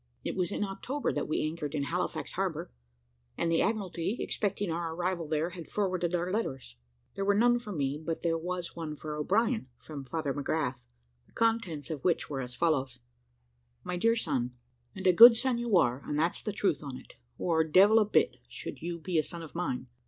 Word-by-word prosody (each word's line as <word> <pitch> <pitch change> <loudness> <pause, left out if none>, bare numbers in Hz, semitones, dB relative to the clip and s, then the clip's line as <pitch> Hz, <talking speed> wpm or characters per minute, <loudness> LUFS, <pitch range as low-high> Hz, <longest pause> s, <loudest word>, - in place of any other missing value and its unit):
It - - -3
was 180 0 0
in 210 - -1
October 210 +9 -2
that - - -2
we 155 - 0
anchored 155 -1 -3
in 145 - 0
Halifax 140 - -2
harbour, - - -2 0.7
and 165 - 0
the 165 - +3
Admiralty, 200 -1 -1
expecting 200 -3 -1
our 165 0 -3
arrival 175 -1 -1
there, 155 +3 0
had 170 -3 -8
forwarded 185 -4 0
our 175 +1 -1
letters. 135 - -3 0.4
There 195 - -3
were 200 0 +3
none 240 +2 +4
for 215 -3 -8
me, 145 -3 -2
but 165 0 -3
there 165 -1 +2
was 180 0 -4
one 160 -2 -5
for 150 0 -6
O'Brien, 220 - +1
from 145 -3 -8
Father 140 +1 -2
McGrath, 135 -3 -2 0.4
the - - -27
contents 225 - 0
of 150 -4 -5
which 175 -4 +1
were 135 -2 -2
as 125 -1 -6
follows: 140 -6 +1 0.9
"MY 180 - -3
DEAR 230 +5 +3
SON, 130 - -1 0.4
"And 190 - -7
a 185 - +6
good 230 +5 +10
son 250 -1 +1
you 235 -5 +2
are, 125 -4 +2
and 150 - -3
that's 165 +3 +1
the 210 - -3
truth 190 -7 0
on 140 -4 -6
it, - - -14 0.2
or 160 -2 +2
devil 195 +8 +6
a 215 - +4
bit 210 - +2
should - - -7
you 170 +1 -3
be 170 0 0
a - - +2
son 170 +1 -6
of 160 - -10
mine. 170 -8 -2
170 Hz, 205 wpm, -30 LUFS, 150-200 Hz, 0.9 s, good